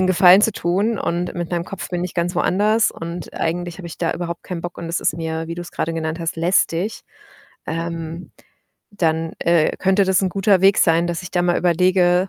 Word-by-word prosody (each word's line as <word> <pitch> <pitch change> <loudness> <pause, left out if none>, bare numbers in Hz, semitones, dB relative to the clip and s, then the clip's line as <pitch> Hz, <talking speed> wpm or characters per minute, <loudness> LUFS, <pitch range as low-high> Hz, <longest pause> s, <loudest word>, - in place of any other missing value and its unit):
'nen 185 - +3
Gefallen 185 +1 +7
zu 225 - +3
tun 195 +6 0
und 175 +1 -2
mit 175 -1 -4
meinem 170 -1 -1
Kopf 195 - -7
bin 175 -1 -2
ich 180 - -5
ganz 175 +1 -1
woanders 210 +5 +2
und 170 0 -7
eigentlich 175 +1 -3
habe 180 - -8
ich - - -9
da 165 - 0
überhaupt 170 -1 -5
keinen 175 -2 -5
Bock 175 0 -6
und 170 - -6
es 165 0 -2
ist 155 - 0
mir, 160 0 -3
wie 165 - -4
du's 175 0 -7
grade 165 +1 -2
genannt 160 0 -3
hast, 165 0 -3
lästig, 175 +3 +1 0.7
ähm, 165 +1 -5 0.6
dann, 165 -4 -1
äh, 170 -2 +2
könnte 190 +1 +3
das 190 -1 +2
'n 190 - 0
guter 195 0 +2
Weg 195 0 +5
sein, 165 +1 +3
dass 175 0 -3
ich 180 - -8
da 175 -1 +1
mal 175 0 +2
überlege, 180 +1 +3
175 Hz, 215 wpm, -20 LUFS, 165-185 Hz, 0.7 s, Gefallen